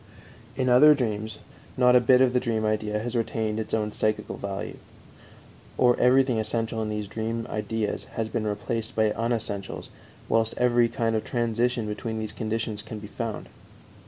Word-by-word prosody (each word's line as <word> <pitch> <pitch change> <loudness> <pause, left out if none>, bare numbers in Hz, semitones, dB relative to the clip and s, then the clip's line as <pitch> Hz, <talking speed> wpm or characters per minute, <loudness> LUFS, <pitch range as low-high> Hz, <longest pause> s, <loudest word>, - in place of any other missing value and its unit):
In 130 - 0
other 140 +5 +7
dreams 110 -4 -2 0.4
not 125 -1 +5
a - - +8
bit 125 +1 +5
of 130 -1 +4
the 125 - +3
dream 115 -3 -1
idea 105 0 0
has 120 +3 -4
retained 110 -1 -1
its 110 - -4
own 105 -1 0
psychical 110 0 -1
value, 100 -1 -5 1.0
or 125 -1 +5
everything 130 -2 +4
essential 110 +1 -1
in 110 - -2
these 105 -1 -3
dream 115 +2 -3
ideas 105 0 -2
has 115 -1 -1
been 110 -1 -2
replaced 110 +2 -3
by 110 -1 +3
unessentials, 110 -4 -3 0.4
whilst 115 0 +1
every 120 -1 +3
kind 115 -3 0
of 110 - 0
transition 120 0 0
between 110 +2 -4
these 110 -1 -4
conditions 110 -1 -3
can 110 - -8
be 105 -1 -9
found. 115 -2 -5
110 Hz, 165 wpm, -26 LUFS, 110-120 Hz, 1.0 s, a